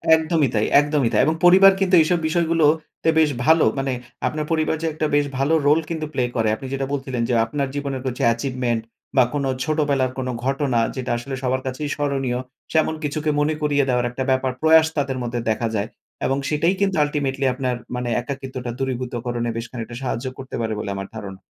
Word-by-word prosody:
একদমই 160 -4 +1
তাই 105 - +2
একদমই 145 -4 +1
তাই। - - +4
এবং 160 +2 +1
পরিবার 190 +2 +8
কিন্তু 190 -1 +3
এইসব 170 +2 +2
বিষয়গুলো 165 -1 +2 0.4
তে - - +3
বেশ 155 -2 +4 0.2
ভালো। 160 +1 +5
মানে 135 -1 -1 0.3
আপনার 155 0 -2
পরিবার 160 0 +1
যে 165 - -1
একটা 155 0 -1
বেশ 145 0 +3
ভালো 140 +4 +1
রোল 150 +2 +5
কিন্তু 160 -2 -3
প্লে 130 - +1
করে। 110 -2 +2
আপনি 135 - -8
যেটা 135 0 -1
বলছিলেন 130 -3 -2
যে, - - +1
আপনার 140 +4 -2
জীবনের 140 -2 -3
কিছু 125 -1 -3
অ্যাচিভমেন্ট 120 -1 0 0.4
বা 130 - +8
কোনো 140 -2 -1
ছোটবেলার 145 -5 +1
কোনো 130 -1 -2
ঘটনা, 135 -2 +1 0.2
যেটা 130 -2 -3
আসলে 135 +3 -5
সবার 130 +1 0
কাছেই 130 +3 -3
স্মরণীয়, 135 -4 -1 0.3
শ্যামন 160 0 +2
কিছুকে 150 +1 -1
মনে 150 +1 +2
করিয়ে 145 -2 +2
দেওয়ার 125 -1 +1
একটা 130 +2 -3
ব্যাপার, 130 0 +1
প্রয়াস 160 0 +6
তাদের 135 -2 -1
মধ্যে 120 0 -2
দেখা 115 +1 0
যায়। 105 +1 -1 0.4
এবং 135 +1 +1
সেটাই 165 +5 +2
কিন্তু 195 -1 +2
আল্টিমেটলি 140 -2 -1
আপনার, 130 -1 -2 0.2
মানে 125 0 -2
একাকিত্বটা 130 -2 -5
দূরীভূতকরণে 120 -2 -2
বেশ 115 - -3
খানিকটা 120 -1 -6
সাহায্য 125 0 -3
করতে 135 0 -7
পারে 110 -1 -1
বলে 100 - -4
আমার 95 0 -5
ধারণা। 100 -3 -7
135 Hz, 190 wpm, -22 LUFS, 125-155 Hz, 0.4 s, পরিবার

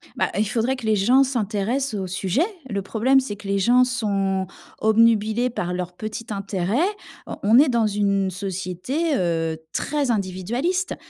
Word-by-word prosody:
Bah, - - 0
il 215 - +2
faudrait 235 +5 0
que 245 - -8
les 220 -1 +3
gens 245 +7 +4
s'intéressent 235 +1 -1
au 190 -2 -3
sujet. 190 - 0 0.2
Le 200 -3 -2
problème, 235 +7 +2
c'est 255 -6 -4
que 205 0 -11
les 200 0 +1
gens 245 +6 +5
sont 200 -6 -1 0.3
obnubilés 220 +2 +3
par 180 -6 -3
leur 180 0 -4
petit 215 +3 -6
intérêt. 195 -3 -3 0.6
Heu, - - -5
on 220 +5 +6
est 300 - +6
dans 235 -3 +2
une 200 -2 +1
société, 190 - -2
heu, 165 -5 0 0.2
très 290 -2 -1
individualiste 230 - -1
215 Hz, 160 wpm, -23 LUFS, 195-250 Hz, 0.6 s, on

